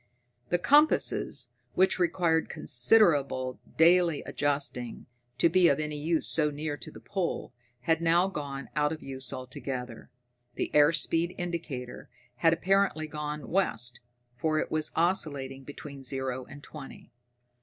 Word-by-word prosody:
The 175 - +2
compasses, 295 - +3 0.3
which 190 0 +3
required 170 -2 +1
considerable 135 - +3 0.2
daily 170 -1 +4
adjusting 140 -4 -3 0.3
to - - +4
be 175 +1 +4
of 140 - +2
use 155 +2 -1
so 150 -2 +3
near 150 +1 -4
to 120 - -9
the - - -12
pole, 175 - -4 0.3
had 160 +5 +1
now 170 +2 +3
gone 140 -6 -6
out 150 0 +1
of 160 - -6
use 130 -2 0
altogether. 125 -2 -7 0.5
The - - -3
air 150 +1 +6
speed 165 +2 0
indicator 165 -8 -5 0.3
had 165 +4 +4
apparently 190 -2 +1
gone 150 -1 -6
west, 120 - -1 0.4
for 155 -1 0
it - - -2
was 155 -1 +1
oscillating 140 -6 -1
between 140 0 -9
zero 130 -1 -4
and 145 0 -13
twenty. 145 -3 -11
150 Hz, 135 wpm, -28 LUFS, 135-170 Hz, 0.5 s, air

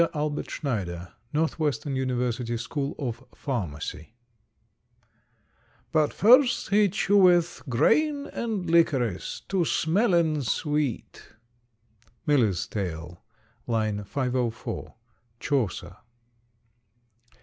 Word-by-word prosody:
ALBERT 150 0 -2
SCHNEIDER, 90 - -4 0.2
Northwestern 150 -3 -1
University 125 -2 -1
School 140 +4 -3
of 125 -6 -4
Pharmacy. 95 - -5 1.8
But 155 -2 +2
first 250 +4 +5
he 205 0 +4
cheweth 180 -3 +3
greyn 285 - +2
and 215 -6 -3
licorys 140 - +1
To 195 - -1
smellen 170 -1 +2
sweete. 145 -3 -2 0.9
_Miller's 115 - +2
Tale, 85 -4 -5 0.5
l. 110 -3 0
504; 125 +1 -3 0.4
Chaucer. 130 -10 -2
140 Hz, 75 wpm, -26 LUFS, 115-170 Hz, 1.8 s, first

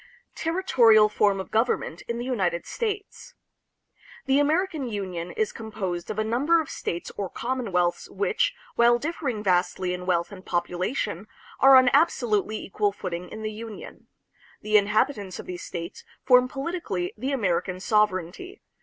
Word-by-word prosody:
Territorial 240 - +4
Form 205 -2 +2
of 190 - -7
Government 220 -7 0
in 235 - -2
the 240 - -4
United 185 -9 -1
States. 435 +2 -5 0.9
The 270 +1 +3
American 310 -1 +1
Union 185 -6 -4
is 215 +3 -1
composed 200 -6 -5
of - - -4
a 215 - +1
number 270 +10 +2
of 315 - -4
states 170 - -4
or 195 -2 -3
commonwealths 200 -9 -1
which, - - 0 0.2
while 235 0 +5
differing 270 -6 -3
vastly 180 -1 +1
in 180 0 -6
wealth 170 0 +1
and 190 -2 -10
population, 180 +3 -2 0.3
are 270 0 +8
on 255 -1 +7
absolutely 230 - +2
equal 205 0 -1
footing 180 -2 -6
in 220 0 -8
the 215 0 -3
Union. 220 -1 -9 0.6
The 215 0 0
inhabitants 205 -1 +2
of - - -8
these 180 -1 -6
states 170 +3 -7 0.2
form 250 -1 +5
politically 270 - -3
the 260 +6 -3
American 185 -7 -1
sovereignty. 210 - 0
215 Hz, 145 wpm, -25 LUFS, 185-260 Hz, 0.9 s, are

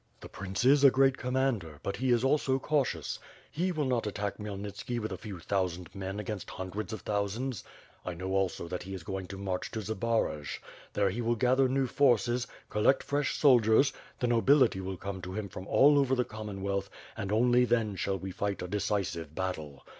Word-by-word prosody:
The - - -8
prince 95 +3 -3
is 140 +2 +6
a 140 - +10
great 135 0 +4
commander, 125 - -1
but 100 - -3
he 130 +1 0
is 120 -1 +3
also 135 -1 +2
cau 145 +2 +2
tious. 130 - -4 0.3
He 180 +4 0
will 155 -4 -1
not 125 -4 0
attack 100 0 -3
Khmyelnitski 105 +3 -4
with 110 -2 -4
a 95 - -4
few 100 -3 -7
thousand 90 -1 -2
men 95 0 -4
against 105 -2 -5
hundreds 95 +4 -5
of 110 - -5
thousands. 105 +4 -2 0.4
I 90 - -4
know 95 +2 -4
also 95 -3 0
that 90 +1 -4
he 95 +2 -6
is 90 - -8
going 95 0 -4
to 100 - -7
march 95 -2 -3
to 110 - -4
Zbaraj. 110 -8 -1 0.4
There 100 -2 +2
he 115 +6 -3
will 120 0 +1
gather 130 +3 +3
new 135 +1 +2
forces, 120 -2 +2 0.2
collect 105 +6 +3
fresh 145 0 0
soldiers, 125 -1 +5 0.3
the - - +1
nobility 120 -2 +4
will 95 0 -4
come 95 0 -5
to 90 +1 -6
him 105 0 -3
from 95 +1 -8
all 145 +1 +6
over 135 -1 +2
the 125 -1 +1
Commonwealth 100 -2 -4 0.3
and 100 - -4
only 120 +3 +4
then 115 -4 +1
shall 95 +1 -1
we 95 0 -6
fight 100 0 -2
a - - -4
de 105 +3 -1
cisive 90 -6 -2
battle. 80 -7 -4
105 Hz, 200 wpm, -30 LUFS, 95-125 Hz, 0.4 s, a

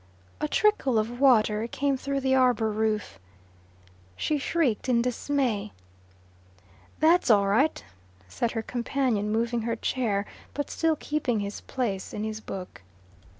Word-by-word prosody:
A - - 0
trickle 275 - +2
of 230 +3 -1
water 225 -5 +4
came 275 +3 0
through 275 +1 -2
the 265 0 +1
arbour 245 -4 +3
roof. 215 0 -1 1.0
She 300 - -1
shrieked 270 -5 0
in 235 -2 +3
dismay. 245 -4 -1 1.3
"That's 330 -1 +4
all 205 -3 +5
right," 225 - +2 0.4
said 230 - -2
her 225 - -2
companion, 235 -3 -1
moving 230 +1 0
her 230 +1 -1
chair, 220 -4 -1 0.3
but 290 - -3
still 325 -1 +1
keeping 280 -7 -1
his 200 0 -5
place 210 -8 -3
in 210 - -3
his 215 0 -4
book. 185 - -8
235 Hz, 135 wpm, -27 LUFS, 215-270 Hz, 1.3 s, all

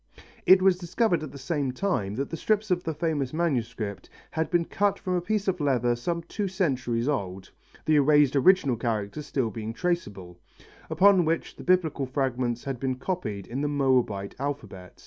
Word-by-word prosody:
It 185 0 +7
was 190 -2 +4
discovered 180 0 +1
at 155 - -6
the 140 - -10
same 140 -1 -2
time 125 - -1
that 135 +3 -3
the - - -2
strips 215 +4 0
of 175 0 +1
the 160 - -2
famous 150 -4 -1
manuscript 120 - -2 0.2
had 160 0 -1
been 175 -2 +2
cut 200 +2 0
from 185 -3 -3
a 180 - +1
piece 205 +2 -1
of 185 -2 0
leather 125 -4 +2
some 170 +8 -3
two 200 +4 -3
centuries 130 - -1
old 95 -9 -3 0.3
the 155 -1 +4
erased 145 -1 +4
original 140 -4 +4
characters 115 +4 -3
still 125 -5 -1
being 110 +2 -5
traceable 100 - -3 0.5
upon 195 -2 +5
which 165 +1 -1
the - - -10
Biblical 165 -7 +1
fragments 125 -3 -1
had 135 -3 -4
been 130 0 -1
copied 125 - -4
in 130 +4 -4
the 145 - 0
Moabite 130 -8 +1
alphabet. 105 -10 -6
140 Hz, 180 wpm, -27 LUFS, 120-175 Hz, 0.5 s, It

